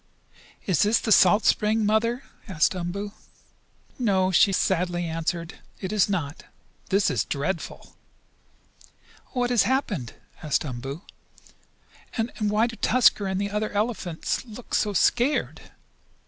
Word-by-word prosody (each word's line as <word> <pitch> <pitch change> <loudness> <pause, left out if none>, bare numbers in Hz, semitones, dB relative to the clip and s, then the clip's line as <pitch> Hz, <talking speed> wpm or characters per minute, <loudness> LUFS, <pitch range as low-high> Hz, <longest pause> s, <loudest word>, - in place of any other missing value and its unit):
"Is 185 -6 +1
this 210 +3 +4
the 220 - -3
salt 205 +2 +5
spring, 215 +1 +2
Mother?" 230 +4 +1 0.2
asked 165 -5 +2
Umboo. 185 +4 -4 0.9
"No," 190 -6 +2
she 195 +2 +5
sadly 175 -2 0
answered. 165 +1 -3 0.2
"It 190 +1 -4
is 205 -2 +3
not. 160 -7 -3 0.4
This 200 +2 +2
is 110 -6 0
dreadful!" 155 +8 -4 1.4
"What 245 -1 0
has 240 - +4
happened?" 205 - -1 0.3
asked 155 -1 0
Umboo. 135 +5 -6 1.1
"And 225 +1 -1
why 210 +1 +2
do 235 -1 -6
Tusker 225 -4 +3
and 190 0 -1
the 200 0 -2
other 210 +1 -1
big - - -12
elephants 205 -6 -2
look 235 0 -11
so 210 -1 +1
scared?" 245 - +1
200 Hz, 130 wpm, -25 LUFS, 175-220 Hz, 1.4 s, salt